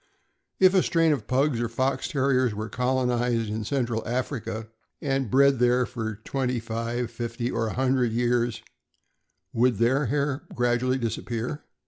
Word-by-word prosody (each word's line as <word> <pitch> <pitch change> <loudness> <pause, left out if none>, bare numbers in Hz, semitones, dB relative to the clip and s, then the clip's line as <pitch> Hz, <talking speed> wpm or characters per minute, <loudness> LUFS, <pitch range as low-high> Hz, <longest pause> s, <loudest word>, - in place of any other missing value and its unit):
If 185 0 +6
a 190 - +5
strain 165 -2 +2
of 145 - -4
Pugs 130 -1 +1
or 120 - -1
Fox 130 +3 -1
Terriers 130 -5 +1
were 110 +1 -4
colonized 125 -2 0
in 110 +1 -3
Central 120 -1 -1
Africa 120 -2 -3 0.3
and 135 -4 -1
bred 140 +2 +4
there 125 +1 +3
for 115 -3 -4
twenty 130 -3 -1
five, 115 +1 -3
fifty, 120 +1 -3
or 115 - -1
a - - -3
hundred 130 -2 +1
years, 120 0 0 0.9
would 120 +1 +3
their 130 +5 +2
hair 140 +2 0
gradually 120 +1 +1
disappear? 120 +3 -3
125 Hz, 145 wpm, -26 LUFS, 115-130 Hz, 0.9 s, If